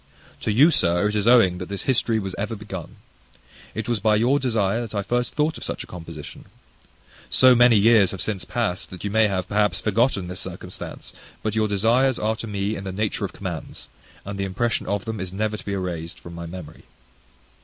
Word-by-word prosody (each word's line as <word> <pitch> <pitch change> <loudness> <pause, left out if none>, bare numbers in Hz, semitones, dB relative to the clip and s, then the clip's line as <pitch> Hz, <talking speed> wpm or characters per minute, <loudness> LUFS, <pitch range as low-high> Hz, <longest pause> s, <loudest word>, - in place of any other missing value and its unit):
To - - -1
you, 140 +10 +6
Sir, 90 - +2
it - - -3
is 105 +1 +1
owing 110 -8 +5
that 90 - -6
this 100 -1 -3
history 115 -3 +1
was 95 -3 -3
ever 105 +3 -3
begun. 100 -5 -8 0.8
It 110 - -3
was 120 -3 0
by 105 +1 +3
your 125 +6 +3
desire 110 -4 +1
that 115 -2 -6
I 100 - 0
first 120 +3 -1
thought 155 +1 0
of - - -8
such - - -4
a - - -10
composition. 85 -2 -9 0.8
So 130 0 +6
many 120 -1 +6
years 105 -2 +5
have 95 - -5
since 100 -5 -2
past, 105 -4 -2
that 90 -2 -9
you 100 - -2
may 110 0 +4
have, 95 -2 -2
perhaps, 105 0 +1
forgotten 105 -3 +1
this 90 0 -5
circumstance: - - -7 0.3
but 110 - -1
your 110 -1 +2
desires 115 +6 +2
are 110 +1 0
to 115 - -6
me 100 +1 -2
in 100 - -6
the 95 - -4
nature 105 +2 -1
of - - -7
commands; - - -7 0.4
and 100 0 -5
the - - 0
impression 100 +5 -1
of 100 -2 -1
them 110 -2 -4
is 95 -1 -3
never 105 +2 -1
to - - -9
be 100 - -3
erased 85 -4 -4
from 85 - -10
my 85 0 -6
memory. 85 -3 -10
105 Hz, 215 wpm, -23 LUFS, 95-115 Hz, 0.8 s, you